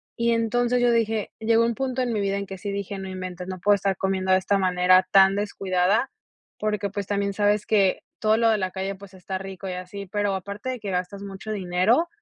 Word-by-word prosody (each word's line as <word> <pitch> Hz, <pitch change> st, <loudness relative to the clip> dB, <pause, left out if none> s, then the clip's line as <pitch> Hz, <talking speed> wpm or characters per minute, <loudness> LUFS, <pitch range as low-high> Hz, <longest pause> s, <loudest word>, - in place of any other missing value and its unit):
Y 235 Hz, 0 st, +1 dB
entonces, 240 Hz, +2 st, +1 dB
yo 245 Hz, 0 st, +4 dB
dije, 225 Hz, -2 st, 0 dB
llegó 230 Hz, +1 st, +3 dB
un 235 Hz, -, 0 dB
punto 260 Hz, +2 st, -2 dB
en 240 Hz, -2 st, -1 dB
mi 215 Hz, -, 0 dB
vida, 200 Hz, 0 st, 0 dB
en 200 Hz, -, -3 dB
que 190 Hz, -1 st, -8 dB
sí 205 Hz, 0 st, -4 dB
dije: 200 Hz, 0 st, -4 dB
"No 190 Hz, 0 st, -6 dB
inventes, 185 Hz, -1 st, -6 dB
no 185 Hz, -1 st, -5 dB
puedo 205 Hz, +3 st, +4 dB
estar 195 Hz, -1 st, 0 dB
comiendo 190 Hz, -1 st, 0 dB
de 185 Hz, -, +6 dB
esta 195 Hz, +1 st, +1 dB
manera 185 Hz, 0 st, +4 dB
tan 195 Hz, 0 st, +6 dB
descuidada", 200 Hz, +2 st, 0 dB, 0.5 s
porque, 210 Hz, -2 st, -1 dB
pues, 200 Hz, -1 st, -4 dB
también 200 Hz, -1 st, -1 dB
sabes 205 Hz, +1 st, +1 dB
que 200 Hz, -4 st, +2 dB, 0.2 s
todo 215 Hz, 0 st, +3 dB
lo 230 Hz, 0 st, +3 dB
de 215 Hz, -, +1 dB
la 185 Hz, -1 st, -1 dB
calle, 190 Hz, +1 st, -3 dB
pues, 195 Hz, 0 st, -14 dB
está 190 Hz, +1 st, -5 dB
rico 195 Hz, 0 st, -7 dB
y 185 Hz, -, -3 dB
así, 185 Hz, +2 st, -7 dB
pero, 205 Hz, +1 st, -1 dB
aparte 200 Hz, +6 st, -5 dB
de 255 Hz, -, -3 dB
que 205 Hz, -2 st, -5 dB
gastas 185 Hz, +2 st, -3 dB
mucho 200 Hz, +2 st, -7 dB
dinero, 195 Hz, -, +2 dB
200 Hz, 230 wpm, -24 LUFS, 190-215 Hz, 0.5 s, de